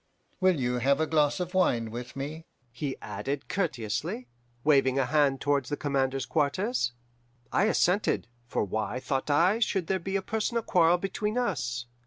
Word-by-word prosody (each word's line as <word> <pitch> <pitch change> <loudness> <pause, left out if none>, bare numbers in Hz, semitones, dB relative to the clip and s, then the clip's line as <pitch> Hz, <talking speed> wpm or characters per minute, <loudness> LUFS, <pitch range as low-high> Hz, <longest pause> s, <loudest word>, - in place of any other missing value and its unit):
Will 185 -5 +3
you 125 -1 0
have 140 +4 +3
a 160 - +2
glass 150 -1 +2
of 180 0 -3
wine 120 -12 +2
with 120 +2 -7
me?' 150 +4 -6 0.2
he 135 +2 -4
added 140 0 -4
courteously, 125 - -2 0.4
waving 135 -3 +4
a 135 - +3
hand 140 -1 +2
towards 145 -1 +1
the 145 - -2
commander's 135 -2 0
quarters. 155 - 0 0.6
"I 200 - +3
assented, 200 - +2 0.2
for - - 0
why, 110 +4 -2
thought 135 +2 -2
I, 175 +9 +4
should 195 -6 +1
there 190 +2 0
be 190 +3 -4
a 195 - 0
personal 225 +2 -1
quarrel 175 -2 +4
between 210 +4 -2
us? 140 - -1
145 Hz, 165 wpm, -28 LUFS, 130-185 Hz, 0.6 s, waving